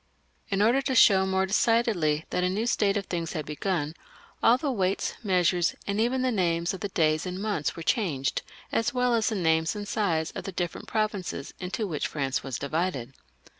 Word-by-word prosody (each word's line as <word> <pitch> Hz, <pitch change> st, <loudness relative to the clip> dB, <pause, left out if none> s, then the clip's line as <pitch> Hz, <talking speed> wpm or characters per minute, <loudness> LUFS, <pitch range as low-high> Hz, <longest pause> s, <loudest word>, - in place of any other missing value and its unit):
In 195 Hz, +1 st, +2 dB
order 240 Hz, +5 st, +4 dB
to 265 Hz, -1 st, -1 dB
show 190 Hz, -4 st, +6 dB
more 190 Hz, 0 st, +1 dB
decidedly 195 Hz, -7 st, +2 dB
that 180 Hz, -, 0 dB
a 180 Hz, -, +2 dB
new 205 Hz, +5 st, -1 dB
state 205 Hz, -4 st, +2 dB
of 200 Hz, -, -3 dB
things 170 Hz, -3 st, -3 dB
had 155 Hz, -3 st, -3 dB
begun, 155 Hz, 0 st, -2 dB, 0.5 s
all 235 Hz, +2 st, +6 dB
the 280 Hz, +1 st, -1 dB
weights, 195 Hz, -5 st, 0 dB
measures, 180 Hz, -3 st, +2 dB
and 200 Hz, +1 st, 0 dB
even 255 Hz, +3 st, +1 dB
the 255 Hz, -, +2 dB
names 170 Hz, -4 st, +1 dB
of 190 Hz, -, -6 dB
the 205 Hz, -, -3 dB
days 155 Hz, -1 st, +1 dB
and 180 Hz, +1 st, -4 dB
months 200 Hz, -7 st, -1 dB
were 165 Hz, -, -6 dB
changed, 160 Hz, -, 0 dB, 0.3 s
as 235 Hz, +2 st, 0 dB
well 250 Hz, -1 st, +2 dB
as 225 Hz, -2 st, +2 dB
the 220 Hz, -, -2 dB
names 160 Hz, -1 st, +2 dB
and 205 Hz, 0 st, -5 dB
size 170 Hz, -8 st, 0 dB
of -, -, -7 dB
the 195 Hz, -, -4 dB
different 175 Hz, -2 st, -4 dB
provinces 205 Hz, -9 st, -2 dB
into 185 Hz, +4 st, -3 dB
which 160 Hz, -7 st, -2 dB
France 135 Hz, -3 st, -2 dB
was 135 Hz, -3 st, -4 dB
divided. 140 Hz, -3 st, -2 dB
190 Hz, 200 wpm, -27 LUFS, 160-215 Hz, 0.5 s, show